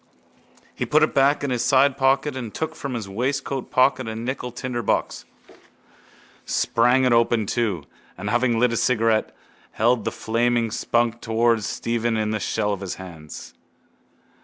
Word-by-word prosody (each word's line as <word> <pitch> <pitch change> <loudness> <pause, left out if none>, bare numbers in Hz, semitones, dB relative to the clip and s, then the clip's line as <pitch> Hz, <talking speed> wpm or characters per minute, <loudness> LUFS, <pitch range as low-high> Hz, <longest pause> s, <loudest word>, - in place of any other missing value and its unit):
He - - -4
put 155 +1 +4
it 155 - +1
back 140 +2 +3
in 140 - -1
his 120 -1 0
sidepocket 135 +1 +3
and 120 -4 -5
took 160 - -4
from 140 -3 -5
his 115 -3 -4
waistcoatpocket 130 +3 0
a 110 - -5
nickel 125 +2 -4
tinderbox, 120 -2 -2 1.2
sprang 125 +3 +2
it 125 - +3
open 115 -1 +2
too, 100 - -1 0.3
and, 95 +3 -6
having 120 -1 +2
lit 125 +1 +3
his 115 - 0
cigarette, 115 -3 +2 0.4
held 115 0 +2
the - - -1
flaming 115 0 0
spunk 120 0 0
towards 115 -1 +1
Stephen 115 -1 -1
in 110 0 -1
the 110 - -1
shell 105 -1 -1
of 100 - -6
his 95 -2 -4
hands. 80 -5 -10
120 Hz, 150 wpm, -23 LUFS, 110-130 Hz, 1.2 s, put